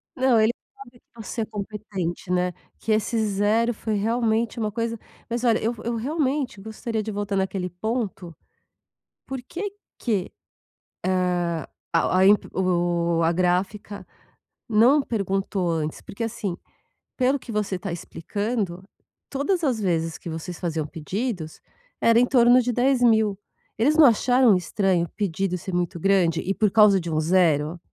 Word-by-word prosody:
Não, 255 -3 +3
ele 220 +1 +4 0.2
sabe 255 -12 -14
que 230 - -14
você 230 - -4
é - - -1
competente, 200 -4 -5
né. 180 0 +1 0.3
Que 225 - -2
esse 215 +2 +1
0 215 +3 +1
foi, 220 0 -3
realmente, 225 +1 0
uma 215 -2 -1
coisa 230 0 -3 0.3
mas, 235 +1 -2
olha, 230 -3 +3
eu 230 +2 0
vo 225 - -12
eu 235 +1 -2
realmente 270 -1 -1
gostaria 220 +1 -4
de 220 - -4
voltar 205 -1 -3
naquele 190 -1 -1
ponto. 190 -3 -4 0.9
Por 265 -1 -5
que 395 +4 -4 0.3
que, 205 -7 -1 1.0
hã, 170 -2 -2 0.3
a 165 - +3
o - - -1
a 185 +1 +4
imp 205 +1 +5
o 175 -2 +1
a 165 +1 +3
gráfica 185 +4 -1 0.6
não 240 +7 +5
perguntou 195 -5 -1
antes? 155 -2 -2
Porque, 230 +3 -5
assim, 220 -5 -3 0.6
pelo 265 +2 +2
que 240 - -9
você 210 -3 -1
tá 195 0 -5
explicando, 195 +2 -3 0.5
todas 330 +6 -1
as 255 -7 +1
vezes 165 -4 0
que - - -8
vocês 165 +2 -6
faziam 165 -3 -2
pedidos, 175 - -4 0.4
era 230 0 +5
em 250 - +5
torno 245 -1 +5
de 245 0 -1
10.000. 235 -5 +3 0.4
Eles 270 +8 +3
não 315 - +8
acharam 245 -1 +5
estranho 180 -1 +1
o - - -13
pedido 195 -2 -2
ser 185 +1 -7
muito 175 -1 -1
grande 180 -3 +2
e 195 - -1
por 210 0 +1
causa 210 -2 +6
de 170 -2 -5
um 155 - +1
0? 160 -1 +2
205 Hz, 160 wpm, -24 LUFS, 180-235 Hz, 1.0 s, não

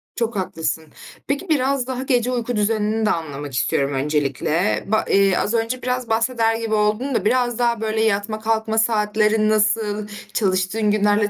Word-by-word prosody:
Çok 230 -1 -2
haklısın. 160 -4 -3 0.4
Peki, 285 +7 -2
biraz 270 -3 +1
daha 260 0 -3
gece 250 -2 +1
uyku 245 0 -2
düzenini 215 +1 0
de 215 - +2
anlamak 145 -4 -4
istiyorum 140 +3 0
öncelikle. 150 +6 0
Ba 220 +1 +1
eee, 195 -2 +3
az 210 - 0
önce 230 +2 -1
biraz 250 -1 -2
bahseder 225 0 +1
gibi 225 -1 -3
oldun 215 +5 0
da 200 - 0
biraz 245 +1 +1
daha, 235 -2 +1
böyle, 220 0 -1
yatma 215 0 0
kalkma 220 0 -1
saatlerin 215 -1 +2
nasıl, 215 -1 +1 0.3
çalıştığın 195 +1 +1
günlerle 205 0 +2
220 Hz, 160 wpm, -21 LUFS, 205-235 Hz, 0.4 s, eee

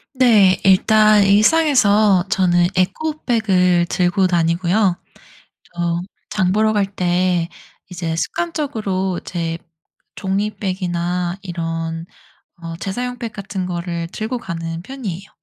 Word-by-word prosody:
네. 210 -7 +5
일단 215 +2 +5
일상에서 210 - +4
저는 175 -2 +3
에코백을 195 - +1
들고 180 +1 +2
다니고요. 175 +3 +1 0.8
저 170 0 -1 0.3
장 190 -4 +1
보러 215 +2 +2
갈 205 -2 +2
때 180 -1 +1 0.4
이제 175 -3 -4
습관적으로 205 - -2
재 165 -2 -3 0.6
종이 200 +2 -1
백이나 180 -2 -2
이런 165 -2 -4 0.6
어 165 0 -6
재사용 245 +7 -4
백 230 -3 -5
같은 195 -2 -5
거를 170 -1 -4
들고 225 +3 -3
가는 165 -5 -5
편이에요. 195 -6 -7
185 Hz, 220 characters per minute, -19 LUFS, 175-215 Hz, 0.8 s, 네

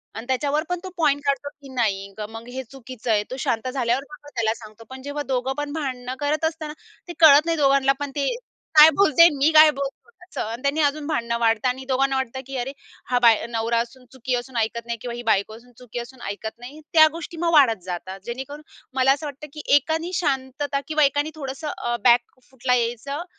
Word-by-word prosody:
आणि 225 - -6
त्याच्यावर 285 +3 0
पण 360 -1 -1
तो 375 - -6
पॉइंट 290 -3 +2
काढतो 280 +1 0
की 275 - -12
नाही 200 -5 -1 0.2
मग 225 +1 -9
हे 260 +1 -5
चुकीचं 255 -3 -6
आहे 210 -1 +3
तो - - -3
शांत 230 0 -1
झाल्यावर 250 0 0
मग - - -14
आपण 290 - -15
त्याला 220 -1 +1
सांगतो. 215 0 -13
पण 260 0 -9
जेव्हा 285 +1 -4
दोघं 255 +1 0
पण 290 0 -3
भांडणं 255 -5 -4
करत 300 +2 0
असताना 315 -1 -3 0.3
ते 345 - -6
कळत 305 -2 +8
नाही 330 -1 0
दोघांना 275 -1 +4
पण 285 -1 -4
ते 280 -2 0 0.5
काय 305 +1 +11
बोलते 335 -3 +6
मी 285 +4 +3
काय 310 0 +9
बोलतो 275 -1 -5 0.2
असं 370 - -6
आणि 235 +2 -6
त्यांनी 280 +3 +1
अजून 290 +1 0
भांडणं 235 -6 -1
वाढतं 225 +1 +2
आणि 260 +1 -4
दोघांना 270 +1 +2
वाटतं 265 -1 -2
की 270 - -6
अरे! 250 +2 -3 0.3
हा 250 -1 +1
बाय 230 -3 +5
नवरा 230 0 0
असून 250 +2 -6
चुकी 260 -1 -2
असून 245 0 -5
ऐकत 230 +1 -1
नाही 235 0 -3
किंवा 245 -1 -5
ही 240 - -6
बायको 220 -1 +1
असून 245 +2 -19
चुकी 245 -1 -7
असून 240 +1 -10
ऐकत 220 +3 -6
नाही. 260 +5 -10
त्या 315 -1 +8
गोष्टी 335 +1 -8
मग 340 -1 +1
वाढत 230 - +5
जातात. 185 +1 -6
जेणेकरून 265 +5 -6 0.3
मला 260 0 +4
असं 285 +3 -1
वाटतं 290 +1 -7
की 300 - -7
एकानी 320 +4 0
शांतता 280 -1 -1
किंवा 310 -1 +2
एकानी 290 +2 +1
थोडंसं 275 0 -6
अ, 240 0 -2
बॅक 240 +1 +3
फूटला 250 -1 0
यायचं 245 +6 -2
265 Hz, 215 wpm, -23 LUFS, 235-290 Hz, 0.5 s, काय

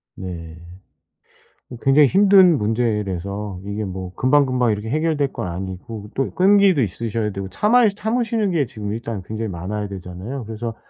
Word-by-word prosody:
네. 85 -3 -7 1.1
어 - - -6
굉장히 140 +2 +5
힘든 190 0 +6
문제라서 105 -4 -2
이게 100 +1 -3
뭐 95 -1 -6
금방, 140 +3 +3
금방 125 -3 +1
이렇게 105 +2 -5
해결될 150 -1 0
건 - - -4
아니고 95 +4 -6
또 135 - +1
이 - - -7
끈기도 195 -4 +4
있으셔야 110 +1 -2
되고 95 -1 -6
참아 225 - +3
이 - - +5
참으시는 225 -1 0
게 160 -5 +1
지금 105 -3 -6
일단 115 -2 -5
굉장히 110 +1 -4
많아야 100 +4 -4
되잖아요. 95 +7 -7
그래서 115 +1 -5
110 Hz, 355 characters per minute, -21 LUFS, 100-145 Hz, 1.1 s, 힘든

